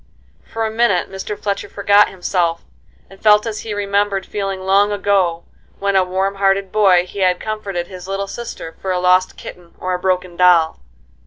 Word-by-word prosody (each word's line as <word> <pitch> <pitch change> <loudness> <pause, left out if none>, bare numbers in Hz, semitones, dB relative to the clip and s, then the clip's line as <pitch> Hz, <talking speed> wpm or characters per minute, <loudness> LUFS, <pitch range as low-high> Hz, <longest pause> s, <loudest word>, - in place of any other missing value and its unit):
For 225 0 -2
a 220 - -2
minute 220 -5 +1
Mr. 195 +2 -5
Fletcher 200 -1 -3
forgot 205 +1 +4
himself, 175 -2 -1 0.4
and 195 - -17
felt 210 0 +5
as 220 -2 -4
he 225 - -7
remembered 200 -1 0
feeling 195 -2 -4
long 195 +2 +3
ago, 195 -4 +1 0.3
when, 200 0 -1
a 190 - +5
warm 190 +2 -2
hearted 195 -1 +2
boy, 190 -4 +4
he 200 - -9
had 180 -1 +2
comforted 200 -5 -4
his 185 0 -10
little 195 +1 -2
sister 195 -6 -8
for 190 - -2
a 180 - 0
lost 180 +1 +2
kitten 175 -1 -11
or 185 0 -3
a 180 - -2
broken 180 -1 -1
doll. 170 -2 +4
195 Hz, 180 wpm, -18 LUFS, 180-205 Hz, 0.4 s, felt